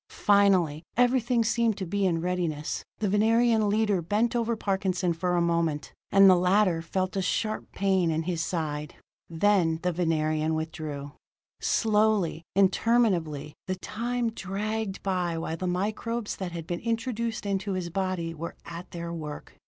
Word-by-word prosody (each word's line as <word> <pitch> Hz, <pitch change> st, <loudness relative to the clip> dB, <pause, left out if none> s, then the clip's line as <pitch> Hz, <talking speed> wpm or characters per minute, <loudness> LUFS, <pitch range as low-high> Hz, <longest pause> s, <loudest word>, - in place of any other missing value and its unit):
Finally, 190 Hz, -7 st, +3 dB, 0.2 s
everything 245 Hz, -1 st, +3 dB
seemed 230 Hz, -1 st, +1 dB
to 190 Hz, -, -3 dB
be 195 Hz, +2 st, 0 dB
in 165 Hz, -2 st, 0 dB
readiness. 170 Hz, -4 st, -2 dB
The 215 Hz, -, -1 dB
Venerian 220 Hz, +1 st, +3 dB
leader 210 Hz, -3 st, +2 dB
bent 215 Hz, +8 st, 0 dB
over 235 Hz, -1 st, +1 dB
Parkinson 190 Hz, -4 st, 0 dB
for 180 Hz, +2 st, -1 dB
a 175 Hz, -, +2 dB
moment: 170 Hz, -3 st, 0 dB, 0.2 s
and 195 Hz, 0 st, +7 dB
the 185 Hz, -, +8 dB
latter 180 Hz, -1 st, +3 dB
felt 185 Hz, +3 st, -2 dB
a 195 Hz, -, +1 dB
sharp 215 Hz, +4 st, -2 dB
pain 190 Hz, -3 st, +1 dB
in 160 Hz, 0 st, 0 dB
his 170 Hz, -1 st, -2 dB
side. 150 Hz, -4 st, -3 dB, 0.3 s
Then 170 Hz, -1 st, +2 dB
the 180 Hz, -, +1 dB
Venerian 155 Hz, -2 st, 0 dB
withdrew. 155 Hz, -3 st, -5 dB, 0.5 s
Slowly, 210 Hz, -6 st, +2 dB
interminably, 190 Hz, -7 st, +2 dB
the 185 Hz, -, -1 dB
time 235 Hz, +4 st, -2 dB
dragged 210 Hz, 0 st, -3 dB
by 180 Hz, -3 st, -1 dB
while 165 Hz, 0 st, -3 dB
the 185 Hz, +2 st, -4 dB
microbes 210 Hz, +5 st, -2 dB
that 185 Hz, -2 st, -4 dB
had 170 Hz, -2 st, -6 dB
been 175 Hz, +1 st, -3 dB
introduced 230 Hz, -1 st, -2 dB
into 200 Hz, 0 st, -1 dB
his 180 Hz, -2 st, -3 dB
body 185 Hz, -3 st, -2 dB
were 165 Hz, +1 st, -6 dB
at 170 Hz, +1 st, -8 dB
their 170 Hz, -1 st, -5 dB
work. 150 Hz, -3 st, -7 dB
185 Hz, 150 wpm, -27 LUFS, 165-215 Hz, 0.5 s, the